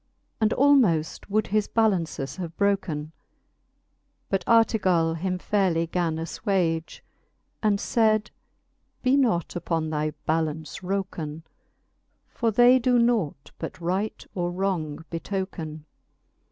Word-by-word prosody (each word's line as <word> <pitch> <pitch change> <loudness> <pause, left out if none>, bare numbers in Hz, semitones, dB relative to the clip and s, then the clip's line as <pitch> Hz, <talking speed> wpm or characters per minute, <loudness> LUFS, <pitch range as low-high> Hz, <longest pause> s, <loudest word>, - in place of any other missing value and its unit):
And 220 -1 +3
almoft 235 - +3
would 215 +1 +1
his 210 +1 0
balances 185 -11 0
have 170 -3 -6
broken: 185 -7 0 1.2
But 195 - +1
Artegall 190 -8 +3
him 180 +3 -2
fairely 180 -4 +1
gan 165 -1 -1
afTwage, 165 0 -1 0.6
And 210 -3 +2
faid; 215 -2 +2 0.7
Be 255 +1 +4
not 225 -14 +1
upon 165 -2 -2
thy 150 0 -1
balance 160 -1 -1
wroken: 180 -5 -4 0.9
For 230 - 0
they 245 +4 +6
doe 250 0 +3
nought 225 - +1
but - - -6
right 185 +5 -2
or 175 -2 -1
wrong 175 -4 -2
betoken. 165 -3 -4
185 Hz, 110 wpm, -25 LUFS, 165-215 Hz, 1.2 s, they